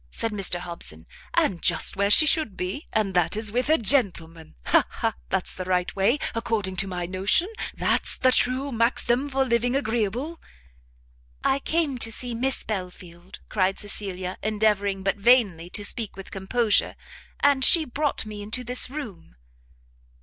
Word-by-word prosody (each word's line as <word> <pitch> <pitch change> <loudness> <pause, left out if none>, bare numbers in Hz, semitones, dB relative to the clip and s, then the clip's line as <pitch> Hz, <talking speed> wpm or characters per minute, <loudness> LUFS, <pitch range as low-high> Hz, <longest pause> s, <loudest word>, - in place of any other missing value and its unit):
said 225 -1 -3
Mr 195 -4 0
Hobson, 170 - -5 0.3
"and 175 -3 +2
just - - +2
where 200 +1 +1
she 260 +9 +6
should 300 -9 +2
be, 185 - -4
and 210 -3 0
that 175 +2 +1
is 215 -1 -3
with 250 +5 0
a 315 - +5
gentleman. 175 - 0
Ha! - - +4
ha! - - -2 0.2
that's - - -1
the 185 - -5
right 180 -1 -1
way, 200 +8 +3 0.2
according 225 -5 -2
to 195 - +1
my 180 -2 -3
notion! 190 - +1 0.3
that's - - +1
the 255 - +3
true 255 +3 +1
maxim 240 +3 +1
for 270 0 +1
living 245 +1 +1
agreeable." 240 - -2 1.0
"I 270 - +2
came 300 -3 -1
to 225 - 0
see 245 +1 -3
Miss 260 +3 -1
Belfield," 180 -3 -7
cried 195 -2 0
Cecilia, 190 -3 -4
endeavouring, 205 -2 0
but 195 +1 0
vainly, 200 -7 +3
to 205 +2 -5
speak 225 0 -2
with 195 - -10
composure, 205 +3 +1 0.5
"and 280 -2 +4
she 320 +4 +6
brought 290 -1 -2
me 210 -1 -7
into 220 +5 -3
this 250 +1 0
room." 230 - -8
215 Hz, 160 wpm, -25 LUFS, 190-250 Hz, 1.0 s, she